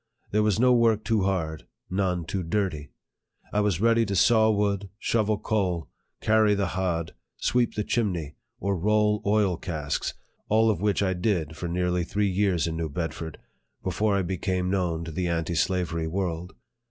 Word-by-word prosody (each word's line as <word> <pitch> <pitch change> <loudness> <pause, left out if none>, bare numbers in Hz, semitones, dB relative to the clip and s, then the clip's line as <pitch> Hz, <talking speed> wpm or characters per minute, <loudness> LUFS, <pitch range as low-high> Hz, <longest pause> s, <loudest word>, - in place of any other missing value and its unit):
There 105 - +3
was 105 -1 +2
no 125 +1 +5
work 115 -3 +3
too 110 -3 +1
hard 80 -5 -2 0.2
none 90 -3 -1
too 95 +4 -2
dirty. 80 -5 -2 0.6
I 105 - +2
was 105 -5 +1
ready 115 +1 +4
to 100 - -1
saw 110 +3 +5
wood, 100 -2 0
shovel 110 -1 +1
coal, 95 -6 -1 0.3
carry 110 -1 +4
the 100 -2 0
hod, 85 -4 -2 0.2
sweep 120 -1 +1
the 105 - 0
chimney, 90 -11 -1 0.3
or 100 +1 0
roll 105 +3 +2
oil 100 -4 +2
casks, 75 -6 -3 0.3
all 110 +1 +4
of 95 - -3
which 105 -1 +1
I 95 -1 +1
did 90 -4 -1
for 85 - -4
nearly 90 +1 0
three 100 +3 0
years 95 -4 +1
in 80 -1 -2
New 80 -1 -2
Bedford, 80 0 -4 0.5
before 105 -1 +1
I 95 - +1
became 90 0 -1
known 85 -4 0
to 80 - -6
the 90 +3 -2
anti 85 0 -1
slavery 85 0 0
world. 90 0 -3
95 Hz, 170 wpm, -26 LUFS, 85-105 Hz, 0.6 s, no